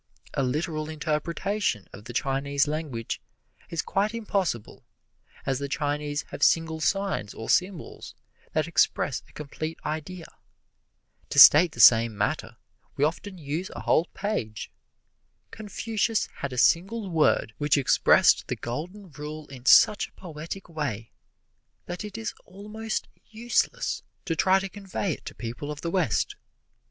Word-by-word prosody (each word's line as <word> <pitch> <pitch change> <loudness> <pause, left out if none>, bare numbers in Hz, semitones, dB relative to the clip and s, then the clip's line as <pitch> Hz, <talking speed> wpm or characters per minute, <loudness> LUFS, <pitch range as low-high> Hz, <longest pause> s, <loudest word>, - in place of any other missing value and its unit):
A - - 0
literal 155 +4 -2
interpretation 160 - -1
of 105 - -11
the - - -7
Chinese 140 +3 0
language 150 -7 -4 0.5
is 165 - -2
quite 210 +3 0
impossible, 195 - -2 0.6
as 135 -1 0
the 140 0 -4
Chinese 145 0 -2
have - - -8
single 160 +1 +3
signs 195 - -1
or 110 - -3
symbols 180 -2 -1 0.4
that - - +1
express - - +1
a - - -19
complete 155 +2 -6
idea. 160 +3 -4 1.0
To - - -5
state 160 +2 +9
the - - -11
same 115 -2 +7
matter, 115 +1 -2 0.4
we 140 - +1
often 185 +5 -4
use 160 +3 -4
a - - -6
whole 160 - +3
page. 115 - -3 0.8
Confucius 220 +1 -1
had 140 - -4
a 125 - -6
single 195 - +2
word 155 -8 +2
which 145 0 +3
expressed 135 -3 +4
the - - -2
Golden 175 - -6
Rule 150 +2 -7
in 130 -2 -10
such 205 - +6
a - - -26
poetic 170 +2 -8
way 145 - -4 0.7
that 175 +2 -5
it 210 0 -7
is 225 - -4
almost 210 +3 -5 0.2
useless 230 +2 0 0.2
to 165 - -1
try 190 +3 +4
to 195 0 -2
convey 195 -1 -4
it - - -11
to - - -7
people 120 +5 -6
of 150 0 -7
the 170 - -3
West. 155 - 0
155 Hz, 145 wpm, -26 LUFS, 140-195 Hz, 1.0 s, state